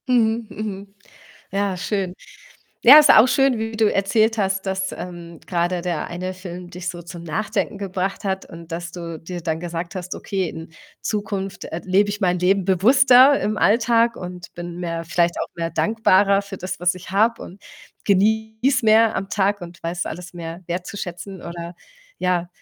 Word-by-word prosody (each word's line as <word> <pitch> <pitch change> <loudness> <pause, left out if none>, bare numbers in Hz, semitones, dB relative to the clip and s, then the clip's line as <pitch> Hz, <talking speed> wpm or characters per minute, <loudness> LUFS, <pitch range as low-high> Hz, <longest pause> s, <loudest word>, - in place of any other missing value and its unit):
Mhm, 230 -2 +2
mhm. 200 -1 -7 0.6
Ja, 195 -1 -1
schön. 190 -1 -2 0.7
Ja, 270 +5 +11
ist 300 - +5
auch 220 - +8
schön, 270 -2 +3
wie 225 0 -3
du 220 -1 +2
erzählt 215 +3 +2
hast, 195 -1 0
dass, 190 0 -2
ähm, 170 -2 -8
grade 175 0 -1
der 175 -3 -2
eine 185 +2 -4
Film 180 -1 -9
dich 180 0 -6
so 175 -1 -5
zum 170 0 -9
Nachdenken 205 +5 -2
gebracht 195 0 -3
hat 190 -1 -2
und 165 0 -12
dass 170 0 -5
du 170 -2 -6
dir 175 +3 -7
dann 160 -1 -2
gesagt 170 +1 -5
hast: 185 0 -5
„Okay, 190 -3 -2
in 160 +1 -9 0.3
Zukunft, 200 -2 -3
äh, 165 - -5
lebe 195 +2 +3
ich 205 +1 -5
mein 180 -2 +2
Leben 190 +2 +2
bewusster 255 +8 +6
im 210 0 -1
Alltag 230 +2 +3
und 180 -1 -8
bin 175 0 -7
mehr 165 -1 -3
vielleicht 170 +1 +1
auch - - -3
mehr 165 -1 -2
dankbarer 200 -2 +3
für 200 0 -8
das, 185 - -5
was 180 0 +2
ich 185 0 -10
habe 220 +4 +2
und 195 +3 -12 0.4
genieße 220 +5 +2
mehr 220 0 +5
am 195 - -3
Tag 200 0 +1
und 175 0 -10
weiß 170 +1 -3
alles 180 +2 -7
mehr 170 +1 -7
wertzuschätzen“, 180 +1 -6
oder 170 0 -7 0.4
ja, 180 -1 0
190 Hz, 175 wpm, -22 LUFS, 175-210 Hz, 0.7 s, Ja